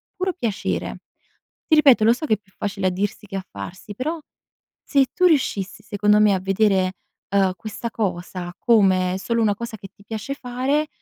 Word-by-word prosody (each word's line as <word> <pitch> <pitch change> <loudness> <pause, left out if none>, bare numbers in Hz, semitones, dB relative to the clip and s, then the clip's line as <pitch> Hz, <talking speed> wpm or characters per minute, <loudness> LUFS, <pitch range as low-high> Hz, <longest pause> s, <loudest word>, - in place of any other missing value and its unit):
puro 370 0 -1
piacere. 230 - -3 0.7
Ti 315 - +5
ripeto, 270 -8 +6
lo 230 - +6
so 255 +6 -3
che 220 - +3
è - - -6
più 200 -2 -31
facile 195 -2 -2
a - - +1
dirsi 200 +3 -3
che 195 -1 -6
a 190 - -4
farsi, 175 - -8
però 310 +8 -3 0.7
se 275 -2 +3
tu 365 - +2
riuscissi, 215 - +1
secondo 210 +1 +2
me, 210 -1 +5
a 190 - +1
vedere, 190 -1 +2 0.4
uhm, 190 -2 +3
questa 220 +3 -6
cosa, 180 -4 -3
come 190 -5 +3
solo 230 +4 0
una 210 -2 +2
cosa 230 0 -6
che 195 - -10
ti 200 - -20
piace 225 +5 -4
fare, 270 +4 -1
210 Hz, 185 wpm, -22 LUFS, 190-245 Hz, 0.7 s, ripeto